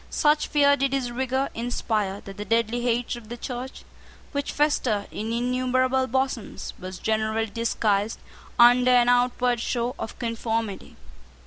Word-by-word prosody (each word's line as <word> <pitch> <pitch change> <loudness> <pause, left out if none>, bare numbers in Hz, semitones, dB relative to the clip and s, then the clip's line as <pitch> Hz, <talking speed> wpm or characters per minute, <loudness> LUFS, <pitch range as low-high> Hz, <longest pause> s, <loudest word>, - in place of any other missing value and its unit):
Such 300 0 +2
fear 285 -1 +4
did 275 -1 0
his 255 -3 -1
rigour 260 +2 -1
inspire 215 -4 -2
that 195 - -10
the 205 - -4
deadly 230 +2 +1
hatred 240 0 -1
of - - -17
the 240 - -6
Church, 250 +2 -6 0.5
which 285 -1 -2
festered 250 -8 +1
in 220 +2 -4
innumerable 255 +2 +1
bosoms, 260 -3 -2
was 185 0 -7
generally 220 +1 0
disguised 215 -1 0 0.4
under 245 +1 +6
an 245 -1 +5
outward 245 0 +2
show 240 +1 -1
of - - -6
conformity. 225 -3 -3
240 Hz, 140 wpm, -25 LUFS, 225-255 Hz, 0.5 s, under